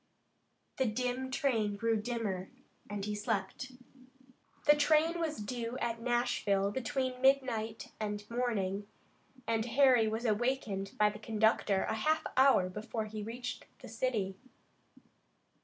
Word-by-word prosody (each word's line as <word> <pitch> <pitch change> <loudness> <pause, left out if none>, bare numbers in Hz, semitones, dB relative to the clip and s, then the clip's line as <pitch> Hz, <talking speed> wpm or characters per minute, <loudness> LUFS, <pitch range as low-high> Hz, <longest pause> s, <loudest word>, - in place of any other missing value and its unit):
The 260 - +2
dim 250 +3 -2
train 235 -7 0
grew 230 +2 +1
dimmer, 210 -4 -2 0.4
and 205 -1 -3
he 210 - -2
slept. 210 +4 -2 0.9
The 295 0 +7
train 310 +3 +3
was 320 -2 -1
due 230 +3 -4
at 230 -2 -2
Nashville 230 -5 +1
between 255 +2 -2
midnight 250 -5 +1
and 210 -1 -3
morning, 205 -5 -1 0.6
and 225 -1 +1
Harry 245 -2 +5
was 220 +2 -2
awakened 215 -3 0
by 210 0 +4
the 210 - -10
conductor 215 -3 +2
a - - -1
half 310 +8 +1
hour 260 -8 +5
before 215 +3 -4
he 215 0 -6
reached 235 +4 -6
the - - -11
city. 220 -5 -2
225 Hz, 125 wpm, -33 LUFS, 210-255 Hz, 0.9 s, The